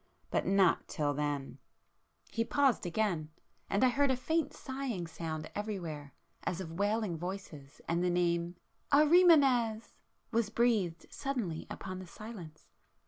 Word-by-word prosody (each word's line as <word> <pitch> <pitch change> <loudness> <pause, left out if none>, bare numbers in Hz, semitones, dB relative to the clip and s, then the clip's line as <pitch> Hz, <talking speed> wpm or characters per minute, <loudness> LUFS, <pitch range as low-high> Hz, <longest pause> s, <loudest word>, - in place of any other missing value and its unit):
—but - - 0
not 195 -2 +3
till 145 -2 -1
then!" 145 -1 -3 0.7
He 230 - 0
paused 265 -6 +2
again,—and 175 +1 -2
I 255 - +6
heard 280 +3 +2
a 260 - +3
faint 315 +3 0
sighing 260 - -4
sound 160 -1 -5
everywhere 170 -9 -5 0.3
as 180 - -2
of 175 -4 -5
wailing 205 -4 0
voices, 170 -6 -7
and 170 +1 +1
the 180 - +2
name 175 0 +1 0.4
"Ahrimanes!" 285 -8 +5 0.4
was 230 -2 +1
breathed 215 -7 +1
suddenly 230 - -3
upon 185 -1 -6
the 185 - -9
silence. 180 -6 -10
195 Hz, 130 wpm, -32 LUFS, 165-240 Hz, 0.7 s, I